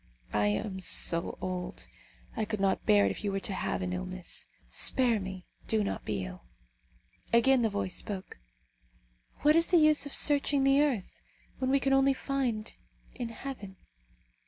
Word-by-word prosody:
I 105 0 +2
am 190 - -2
so 170 -2 0
old, 180 -1 -5 0.5
I 220 - -1
could 215 -1 -3
not 195 -1 0
bear 100 -1 +6
it 100 - +1
if - - -6
you 205 - 0
were 195 - -1
to 195 - -3
have 190 - -2
an 180 0 -2
illness. 185 0 -5 0.2
Spare 245 -4 +2
me! 190 -1 -7 0.2
do 220 -1 +2
not 200 - -4
be 100 -3 -2
ill!" 90 -7 -10 0.9
Again 255 +2 +5
the 225 - +2
voice 200 -3 -2
spoke, 195 - -6 1.0
"What 300 +1 +6
is 330 0 +5
the 360 - +4
use 305 -2 +4
of 285 - -7
searching 285 -1 +3
the 275 +1 +5
earth, 260 -10 -1 0.4
when 260 - 0
we 275 +1 +4
can 270 0 +1
only 270 0 +4
find 250 -6 -2 0.4
in 240 -2 -5
heaven?" 230 -5 -8
215 Hz, 170 wpm, -30 LUFS, 185-270 Hz, 1.0 s, bear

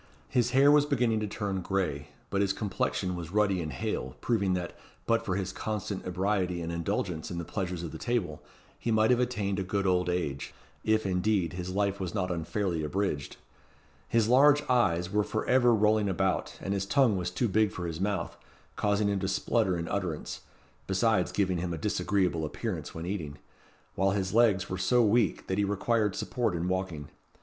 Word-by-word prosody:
His 120 -2 +2
hair 135 +3 +5
was 145 0 +5
beginning 120 -6 +1
to 105 - -2
turn 100 -2 -3
gray, 85 -7 -2 0.2
but 100 - +1
his 100 -1 +2
complexion 95 -3 -2
was 85 -1 -6
ruddy 100 -3 +2
and 80 -2 -4
hale, 65 -1 -3
proving 100 -6 +1
that, 90 -1 -4 0.3
but 115 0 +2
for 95 -4 -1
his 95 -1 -2
constant 105 -3 -4
ebriety 90 -1 0
and 85 0 -4
indulgence 85 -1 -2
in 85 - -5
the 85 - -4
pleasures 90 -2 -3
of 85 - -5
the - - -8
table, 105 -11 -2 0.4
he - - -3
might 110 +1 +4
have 125 - +4
attained 105 -6 -1
a - - -1
good 100 +1 -1
old 90 -1 +2
age 80 -6 -3 0.3
if, 110 -1 +2
indeed, 95 -1 +1
his 90 0 -5
life 100 +1 0
was 95 +1 -4
not 90 -3 -1
unfairly 85 0 -2
abridged. 75 -2 -2 0.7
His 115 -2 +3
large 145 +4 +6
eyes 95 -8 +2
were 105 0 +2
for 110 - -3
ever 125 -1 +4
rolling 105 -1 +3
about, 95 0 -1
and 95 - -1
his 95 -1 -2
tongue 130 -3 +4
was 90 -1 -1
too 105 +7 0
big 105 0 +2
for 90 - -5
his 85 0 -4
mouth, 95 -4 -1 0.4
causing 105 0 +1
him 100 -1 0
to 95 - -2
splutter 95 -1 +1
in 85 0 -4
utterance, 90 -6 -3 0.5
besides 95 -1 +2
giving 95 -3 0
him 85 -1 -2
a - - -7
disagreeable 90 0 0
appearance 75 - -4
when 80 +1 -5
eating; 80 -6 -4 0.6
while 95 +1 +2
his 95 -1 -1
legs 105 -5 +4
were 95 - -4
so 120 +6 +3
weak, 110 0 +2
that 95 +1 -1
he - - +3
required 105 +1 +1
support 120 -7 -1
in 85 +1 -2
walking. 90 -6 -3
95 Hz, 195 wpm, -29 LUFS, 90-105 Hz, 0.7 s, large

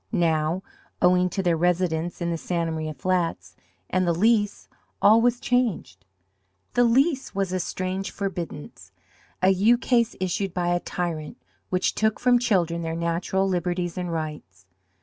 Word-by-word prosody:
Now, 165 -2 +1 0.4
owing 180 0 +4
to 190 +2 -2
their 175 -2 +2
residence 175 0 0
in 170 0 -1
the - - -1
Santa 170 -1 -2
Maria 155 -1 -4
flats, 165 - -1 0.3
and 185 0 0
the 170 - +2
Lease, 205 +2 +1 0.3
all 220 +2 +6
was 245 +1 +2
changed. 215 - -1 0.7
The 245 - +4
Lease 265 - +2
was 195 -2 -1
a 185 - 0
strange 185 +2 -3
forbiddance, 175 -7 -6 0.5
a 185 - +6
ukase 235 +4 +2
issued 185 0 -2
by 175 -1 0
a 175 0 +2
tyrant, 170 -4 -4 0.3
which 185 0 +1
took 220 0 0
from 245 -1 +4
children 175 -8 +1
their 165 0 -3
natural 170 +3 0
liberties 175 -1 -1
and 180 -1 -3
rights. 150 - -6
180 Hz, 150 wpm, -25 LUFS, 165-200 Hz, 0.7 s, all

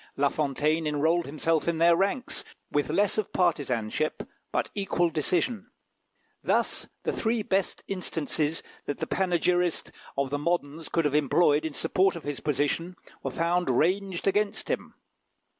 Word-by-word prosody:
La 140 0 +3
Fontaine 155 +2 0
enrolled 160 +3 +1
himself 155 +3 0
in 170 -1 +1
their 170 +1 +6
ranks, 200 +7 -1 0.3
with 145 0 +1
less 200 +6 +2
of 215 - -2
partisanship, 145 - 0 0.2
but - - -1
equal 175 -4 +1
decision. 185 - 0 0.7
Thus, - - +1 0.2
the - - 0
three 225 -1 0
best 195 -1 0
instances 160 -4 -1 0.2
that 145 - -2
the - - -2
panegyrist 180 -1 +1 0.3
of 140 -1 0
the 145 - 0
moderns 160 -1 -1
could 165 -2 +1
have 145 - +1
employed 150 +1 +3
in 160 - -3
support 185 +5 +2
of 170 - -7
his 145 -1 -4
position, 150 +5 -1 0.3
were - - -2
found 175 -1 0
ranged 180 +7 +1
against 205 +2 +1
him. - - -3
165 Hz, 145 wpm, -28 LUFS, 150-185 Hz, 0.7 s, their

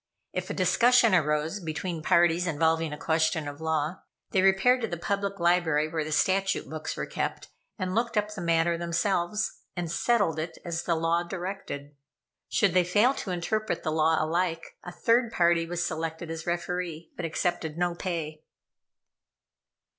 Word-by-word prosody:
If - - -3
a - - -3
discussion 240 -3 +4
arose 155 +2 +1
between 165 0 -4
parties 170 +2 +3
involving 160 0 +1
a 150 - -5
question 160 -1 +1
of 145 +2 -7
law, 160 +2 -1 0.3
they 190 - +3
repaired 195 +7 +4
to 225 - -1
the 170 - -4
Public 200 +2 -2
Library, 170 -3 +2
where 155 0 -2
the 155 - -6
statute 190 +5 +1
books 155 0 -5
were - - -2
kept, - - -4 0.3
and 185 -3 -2
looked 230 +1 0
up 210 0 +1
the 195 - -6
matter 170 0 +2
themselves, 175 +3 -1 0.2
and 175 -3 -3
settled 200 -5 +1
it 165 +1 -4
as 170 -1 -2
the 170 - +2
law 165 +1 +1
directed. 175 -5 -6 0.5
Should 200 -5 +2
they 180 -1 +5
fail 210 +9 +3
to 210 - -6
interpret 180 +2 -2
the 155 - -1
law 160 +1 +3
alike, 165 +1 -1
a 175 - -7
third 230 +6 +2
party 170 -3 +2
was 175 0 -2
selected 160 0 -4
as 165 0 -6
referee, 175 -1 -3
but 180 - -6
accepted 165 -1 -2
no 175 0 +1
pay. 165 -4 -4
170 Hz, 165 wpm, -27 LUFS, 160-185 Hz, 0.5 s, they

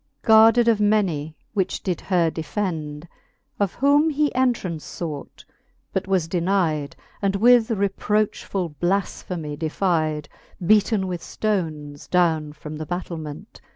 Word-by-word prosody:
Guarded 225 +2 +6
of 225 -2 +4
many, 180 -8 +1 0.2
which 195 -4 -1
did 180 -3 -2
her 175 -4 +1
defend; 160 -3 -4 0.5
Of 200 -3 0
whom 290 +4 +4
he 295 -1 +1
entraunce 235 -11 -1
fought, 155 -5 -6 0.5
but 190 0 -1
was 185 -4 +1
denide. 170 -5 0 0.3
And 200 -1 +1
with 235 +2 +5
reprochfuU 200 -4 -1
blafphemy 175 -4 -2
defide. 155 -2 0 0.4
Beaten 210 0 +3
with 180 -2 -4
ftones 155 -9 -3
downe 160 -4 +2
from 150 0 -8
the 155 0 -6
battilment. 165 -4 -6
180 Hz, 120 wpm, -23 LUFS, 155-210 Hz, 0.5 s, Guarded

